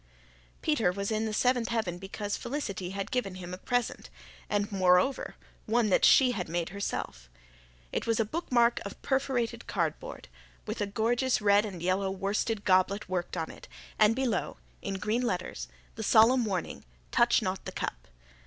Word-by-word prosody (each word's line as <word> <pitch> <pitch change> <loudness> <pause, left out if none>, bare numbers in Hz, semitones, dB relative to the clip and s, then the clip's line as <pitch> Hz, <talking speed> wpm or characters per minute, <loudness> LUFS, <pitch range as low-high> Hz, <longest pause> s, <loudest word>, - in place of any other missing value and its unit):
Peter 275 - +2
was 200 +3 -3
in 220 0 0
the - - -2
seventh 245 +1 +2
heaven 205 -7 -2
because 205 +2 -4
Felicity 225 -9 -4
had 195 +1 -4
given 200 -7 -1
him 180 -1 -7
a - - -4
present 245 +1 -2 0.4
and, 205 +1 0
moreover, 185 +6 +2 0.3
one 225 -1 +2
that - - +3
she 260 -2 +7
had 180 -8 -4
made 170 0 -1
herself. 60 - -4 0.6
It - - -2
was 230 0 +2
a 225 - +3
bookmark 240 -3 +2
of 200 - -8
perforated 250 -4 -1
cardboard, 165 -5 -3 0.4
with - - -4
a 205 - 0
gorgeous 240 +5 +1
red 205 0 +4
and 185 -5 -7
yellow 190 +2 +1
worsted 200 +3 -1
goblet 190 +2 +3
worked 180 -1 -2
on 160 -1 -3
it, - - -13 0.3
and 215 +1 +5
below, 260 -4 -1 0.2
in 195 - -3
green 210 +5 0
letters, 180 - -3 0.3
the - - -7
solemn 235 +3 +5
warning, 190 -4 -3 0.3
"Touch - - +4
Not - - -3
The - - -4
Cup." - - -5
205 Hz, 165 wpm, -29 LUFS, 185-235 Hz, 0.6 s, she